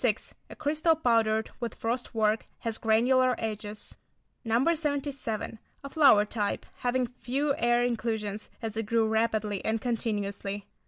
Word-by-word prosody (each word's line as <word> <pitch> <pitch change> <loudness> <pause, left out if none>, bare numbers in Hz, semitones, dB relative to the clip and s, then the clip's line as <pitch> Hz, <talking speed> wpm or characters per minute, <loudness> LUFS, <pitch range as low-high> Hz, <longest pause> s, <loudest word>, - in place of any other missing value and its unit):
A - - -9
crystal 310 +2 +2
powdered 225 -6 +2
with 235 -3 -4
frost 240 +1 -3
work; 215 0 +2 0.2
has 225 -1 -2
granular 250 +3 +3
edges. 215 -1 -5 0.5
No. 240 +8 +3
77. 280 -8 -3 0.2
A 275 - -6
flower 275 -10 +6
type, 210 -1 -2
having 250 +1 0
few 265 +4 -1
air 240 +1 +3
inclusions, 220 -3 -2
as 220 -1 -3
it 225 -1 -2
grew 225 0 +2
rapidly 220 -2 0
and 220 +1 0
continuously. 205 -4 -2
230 Hz, 130 wpm, -29 LUFS, 215-255 Hz, 0.5 s, flower